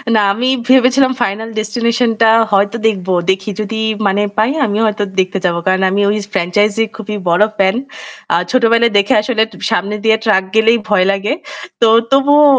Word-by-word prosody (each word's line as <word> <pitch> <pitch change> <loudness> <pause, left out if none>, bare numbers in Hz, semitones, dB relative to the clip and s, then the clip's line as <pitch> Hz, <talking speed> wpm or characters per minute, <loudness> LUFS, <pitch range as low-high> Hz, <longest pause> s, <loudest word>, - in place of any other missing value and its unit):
না 215 - +4
আমি 240 +5 -2 0.2
ভেবেছিলাম 260 +1 +4
'Final 220 0 -3
Destination' 235 +2 -1
টা 225 - +5 0.2
হয়তো 200 +3 +1
দেখবো। 190 -3 -2 0.2
দেখি 190 +2 -1
যদি 220 +1 -4 0.3
মানে 195 +1 0 0.2
পাই 220 +5 +2
আমিও 215 0 -1
হয়তো 210 -1 -2 0.2
দেখতে 190 +1 -1
যাবো। 170 -1 0
কারণ 185 0 +1
আমি 200 +1 0
ওই 210 - 0 0.2
franchise 195 +3 0
এ - - -1
খুবই 215 -1 -6
বড় 175 +4 +3
fan। 190 +1 +2 0.6
আ - - +4 0.2
ছোটবেলায় 235 -1 +2
দেখে 200 +6 +2
আসলে 220 0 -1
তু - - -15 0.2
সামনে 200 +4 -1
দিয়ে 220 0 +3
truck 210 -4 +2
গেলেই 225 +1 +4
ভয় 195 -3 +2
লাগে। 195 +6 -2 0.5
তো 230 - +5 0.2
তবুও 285 +2 +4
215 Hz, 175 wpm, -14 LUFS, 195-230 Hz, 0.6 s, টা